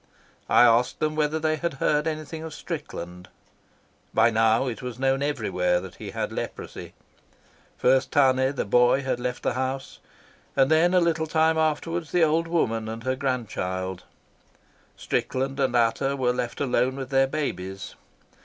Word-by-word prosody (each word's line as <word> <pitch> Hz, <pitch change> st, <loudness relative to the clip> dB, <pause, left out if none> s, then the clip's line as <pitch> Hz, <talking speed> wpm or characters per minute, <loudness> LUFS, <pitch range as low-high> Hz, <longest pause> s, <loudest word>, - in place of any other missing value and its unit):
I -, -, +6 dB
asked 120 Hz, +1 st, +3 dB
them 155 Hz, 0 st, 0 dB
whether 155 Hz, 0 st, +1 dB
they 155 Hz, 0 st, 0 dB
had 170 Hz, -2 st, -3 dB
heard 150 Hz, +3 st, +1 dB
anything 155 Hz, 0 st, -4 dB
of 160 Hz, -1 st, -7 dB
Strickland. 90 Hz, -, -7 dB, 0.9 s
By 115 Hz, -, +5 dB
now 110 Hz, +3 st, +3 dB
it 125 Hz, -1 st, -4 dB
was 125 Hz, -2 st, -6 dB
known 135 Hz, +1 st, +1 dB
everywhere 105 Hz, -11 st, 0 dB
that 95 Hz, 0 st, -10 dB
he -, -, -7 dB
had -, -, -3 dB
leprosy. -, -, -6 dB, 0.8 s
First 130 Hz, +1 st, +2 dB
Tane, 130 Hz, -1 st, +3 dB
the -, -, -1 dB
boy, 125 Hz, +5 st, +3 dB
had 130 Hz, -2 st, -1 dB
left 125 Hz, 0 st, -4 dB
the -, -, 0 dB
house, 130 Hz, +1 st, -4 dB, 0.6 s
and 135 Hz, +1 st, +3 dB
then, 170 Hz, +3 st, +4 dB
a -, -, +6 dB
little 165 Hz, -2 st, +1 dB
time 160 Hz, 0 st, +2 dB
afterwards, 160 Hz, +1 st, -1 dB
the 175 Hz, -2 st, +3 dB
old 160 Hz, +1 st, +2 dB
woman 115 Hz, -10 st, 0 dB
and 115 Hz, +1 st, -6 dB
her 130 Hz, +1 st, 0 dB
grandchild. 95 Hz, -, -3 dB, 0.9 s
Strickland 135 Hz, +2 st, -2 dB
and 130 Hz, -2 st, +1 dB
Ata 120 Hz, +4 st, +2 dB
were 125 Hz, -2 st, +1 dB
left 120 Hz, -1 st, -4 dB
alone 130 Hz, -1 st, +1 dB
with 135 Hz, -1 st, -6 dB
their 135 Hz, 0 st, +4 dB
babies. 95 Hz, -10 st, -4 dB
135 Hz, 160 wpm, -25 LUFS, 120-155 Hz, 0.9 s, I